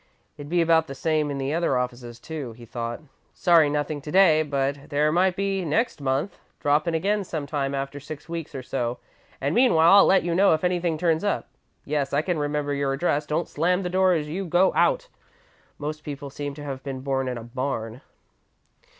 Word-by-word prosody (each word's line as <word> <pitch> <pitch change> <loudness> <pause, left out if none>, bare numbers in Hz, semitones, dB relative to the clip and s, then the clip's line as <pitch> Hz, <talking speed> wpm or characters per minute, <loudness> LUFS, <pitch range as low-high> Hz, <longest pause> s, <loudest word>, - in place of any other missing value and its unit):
"It'd 145 0 -9
be 175 0 +3
about 165 -1 +3
the 140 - -7
same 155 0 0
in 140 - -3
the 135 +2 -2
other 165 -5 +1
offices, 120 -1 -4
too," 145 -5 -6
he 120 +1 -13
thought. 120 +2 -5 0.3
"'Sorry, 170 -5 +5
nothing 145 0 -2
to 150 - -7
day, 175 -4 +5
but 140 0 -2
there 150 +1 +2
might 180 +2 +2
be 195 -1 -1
next 170 +2 0
month. 140 +7 -1 0.2
Drop 150 +3 +2
in 165 - 0
again 200 +5 0
sometime 145 -5 -3
after 140 +1 -4
six 150 +2 -9
weeks 165 -3 -6
or 130 - -5
so 125 -1 -2 0.4
and 140 +2 -1
meanwhile 200 -7 +6
I'll - - +7
let 195 - +4
you 170 0 -1
know 190 -1 +5
if 155 - -6
anything 175 -2 0
turns 165 0 +1
up. 205 - -1 0.4
Yes, 140 -2 -1
I 145 +2 +2
can 175 -3 -1
remember 145 0 -1
your 140 -1 0
address. 150 0 0
Don't 155 +3 -1
slam 180 +3 0
the 180 - -2
door 185 0 +4
as 155 -3 -1
you 180 +6 -3
go 175 +2 +3
out. - - +2 0.7
Most 150 +1 -5
people 140 -1 -7
seem 145 0 -5
to 145 - -9
have 135 -2 -5
been 135 -2 -6
born 135 -1 -1
in 125 -1 -3
a 115 - -7
barn.' 120 -1 -4
150 Hz, 205 wpm, -25 LUFS, 140-170 Hz, 0.7 s, I'll